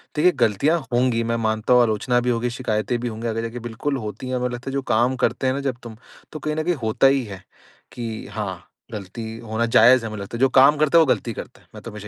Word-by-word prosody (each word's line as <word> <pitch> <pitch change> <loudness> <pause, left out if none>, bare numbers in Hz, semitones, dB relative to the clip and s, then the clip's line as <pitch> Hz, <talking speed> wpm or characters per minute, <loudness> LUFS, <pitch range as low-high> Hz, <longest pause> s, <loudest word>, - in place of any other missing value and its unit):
देखिए 175 +4 +4
गलतियाँ 140 - +1
होंगी 120 -1 +2
मैं 115 0 -1
मानता 110 +2 +1
हूँ 125 - +6
आलोचना 120 +2 +1
भी 125 0 -1
होगी 120 0 0
शिकायतें 120 -1 -2
भी 120 - -3
होंगी। 115 0 -5
आगे 115 0 -2
जाके 115 +1 -5
बिल्कुल 120 +5 -3
होती 110 +2 -6
है 130 - -1
हमें 125 0 -1
लगता 120 +2 -6
है - - -6
जो 140 - -1
काम 120 +4 +2
करते 135 - -1
हैं 130 - +2
ना 140 - -3
जब 125 - -5
तुम 115 -2 -10 0.3
तो 155 - -7
कहीं 150 0 -3
न 155 - -1
कहीं 175 +2 0
होता 110 +4 +3
ही 135 -1 +2
है 100 -3 -10 0.5
की 115 -2 -6
हाँ, 95 -4 -6 0.3
गलती 105 +1 -7 0.2
होना 115 +1 -2
जायज़ 120 +1 +5
हमें 110 -1 -5
लगता 100 +4 -6
है। - - -9
जो 135 - +5
काम 135 +3 +5
करता 155 +2 +3
है - - +8
वो 165 - +5
गलती 120 -3 0
करता - - -10
है। - - -27
मैं - - -9
तो 115 - -8
हमेशा 105 0 -9
120 Hz, 265 wpm, -22 LUFS, 110-130 Hz, 0.5 s, है